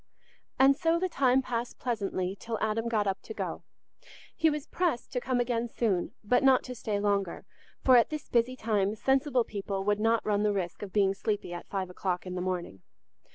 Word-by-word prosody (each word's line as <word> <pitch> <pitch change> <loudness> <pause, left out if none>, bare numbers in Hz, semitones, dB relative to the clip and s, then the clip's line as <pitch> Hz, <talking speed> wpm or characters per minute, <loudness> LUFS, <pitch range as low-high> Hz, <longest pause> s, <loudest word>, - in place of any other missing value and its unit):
And 270 +1 +6
so 330 +2 +2
the 370 +2 0
time 265 -5 +2
passed 240 -1 -3
pleasantly 195 -6 -2
till 225 +2 -4
Adam 220 +1 0
got 220 -3 +1
up 195 -1 -1
to 220 - -9
go. - - -4 0.7
He 325 - +3
was 300 -1 -3
pressed 340 -9 -1
to 250 - -1
come 255 -1 0
again 240 -1 0
soon, 205 -7 0
but 245 +4 +3
not 265 -1 +5
to 250 - -6
stay 215 -4 -2
longer, 200 -3 -1 0.4
for 255 -2 +7
at 235 - +4
this 305 -1 -5
busy 240 +2 +1
time 210 -4 0
sensible 265 +1 +2
people 200 -2 -4
would 205 +1 +1
not 225 +1 +2
run 205 -1 +1
the 210 0 +2
risk 180 -3 -3
of 205 -2 -6
being 195 -1 +3
sleepy 205 -3 -3
at 175 - -7
five 190 -2 -3
o'clock 180 0 -2
in 185 - -5
the 180 - -3
morning. 180 - -3
220 Hz, 200 wpm, -29 LUFS, 195-255 Hz, 0.7 s, for